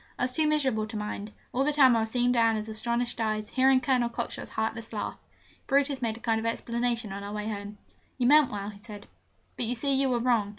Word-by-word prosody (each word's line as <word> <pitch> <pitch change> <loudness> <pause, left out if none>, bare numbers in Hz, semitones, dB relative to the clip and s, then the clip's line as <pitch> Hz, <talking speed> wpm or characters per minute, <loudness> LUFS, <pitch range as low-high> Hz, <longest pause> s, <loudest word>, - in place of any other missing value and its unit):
I - - -2
was 250 0 +1
too 310 +3 +2
miserable 265 -8 +1
to 220 0 -6
mind: 210 0 -5 0.2
all 260 - +2
the 300 - +2
time 265 -4 +6
I - - +3
was 220 0 -1
seeing 245 +1 +2
Diana's 225 -3 +2
astonished 235 +2 -2
eyes, 215 -1 -1
hearing 265 0 +4
Colonel 250 -2 +2
Cockshott's 235 0 -5
heartless 225 +1 -3
laugh. 210 - -3 0.5
Brutus 275 -1 +1
made 225 -2 -1
a - - -14
kind 225 -2 +1
of 220 - -5
explanation 235 -1 -2
on 200 +1 -6
our 205 +1 -6
way 210 0 -3
home: 205 -1 -5 0.4
'You 250 - 0
meant 295 +1 +6
well,' 205 0 -4
he 200 - -15
said, 210 -1 -10 0.5
'but 240 - -1
you 245 - -1
see 275 +4 0
you 270 0 +2
were 245 - +2
wrong. 235 -4 +2
235 Hz, 230 wpm, -28 LUFS, 215-255 Hz, 0.5 s, time